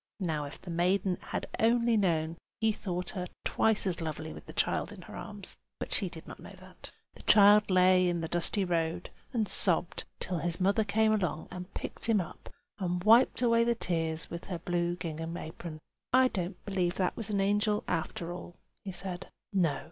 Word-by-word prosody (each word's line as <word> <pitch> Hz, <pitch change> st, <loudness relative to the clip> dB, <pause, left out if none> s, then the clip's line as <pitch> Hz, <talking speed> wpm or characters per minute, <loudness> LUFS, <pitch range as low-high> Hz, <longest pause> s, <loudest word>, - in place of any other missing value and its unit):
(Now 160 Hz, -6 st, -1 dB
if 140 Hz, -, -9 dB
the 180 Hz, -, -8 dB
maiden 180 Hz, +2 st, +1 dB
had -, -, -3 dB
only 235 Hz, +1 st, +3 dB
known, 165 Hz, -5 st, +1 dB, 0.2 s
he 220 Hz, -1 st, +3 dB
thought 180 Hz, -3 st, -3 dB
her 180 Hz, -3 st, -4 dB, 0.2 s
twice 220 Hz, -2 st, +2 dB
as 175 Hz, -3 st, -1 dB
lovely 155 Hz, 0 st, -4 dB
with -, -, -12 dB
the -, -, -7 dB
child -, -, 0 dB
in -, -, -10 dB
her -, -, -10 dB
arms; -, -, -6 dB, 0.2 s
but -, -, -3 dB
she -, -, +1 dB
did -, -, -10 dB
not -, -, -9 dB
know.) -, -, -11 dB, 0.6 s
The -, -, -12 dB
child 210 Hz, 0 st, +7 dB
lay 185 Hz, 0 st, +5 dB
in 175 Hz, -1 st, 0 dB
the 165 Hz, -, -2 dB
dusty 175 Hz, +4 st, +1 dB
road 170 Hz, 0 st, -1 dB, 0.2 s
and 225 Hz, -5 st, 0 dB
sobbed, 180 Hz, -2 st, +2 dB
till 180 Hz, -2 st, -2 dB
his 170 Hz, +2 st, -1 dB
mother 200 Hz, +4 st, +3 dB
came 220 Hz, +1 st, +2 dB
along 180 Hz, -7 st, -1 dB
and 180 Hz, +1 st, -7 dB
picked -, -, -4 dB
him 220 Hz, -3 st, +4 dB
up, 175 Hz, -, -7 dB, 0.3 s
and 180 Hz, -2 st, -1 dB
wiped 230 Hz, +4 st, +5 dB
away 230 Hz, -1 st, +4 dB
the 235 Hz, 0 st, +2 dB
tears 165 Hz, -6 st, -1 dB
with 170 Hz, 0 st, -6 dB
her 180 Hz, -, -4 dB
blue 175 Hz, 0 st, -1 dB
gingham 165 Hz, 0 st, -5 dB
apron. 160 Hz, -1 st, -7 dB, 0.3 s
"I 255 Hz, 0 st, +5 dB
don't 180 Hz, -2 st, -3 dB
believe 185 Hz, -3 st, 0 dB
that 185 Hz, -2 st, 0 dB
was 225 Hz, -3 st, -2 dB
an 205 Hz, -1 st, 0 dB
angel, 205 Hz, +1 st, +2 dB
after 165 Hz, +1 st, -2 dB
all," 175 Hz, -1 st, -9 dB, 0.3 s
he 195 Hz, -, -5 dB
said. 185 Hz, 0 st, -5 dB, 0.2 s
"No!" 165 Hz, -8 st, +2 dB
180 Hz, 195 wpm, -30 LUFS, 170-205 Hz, 0.6 s, child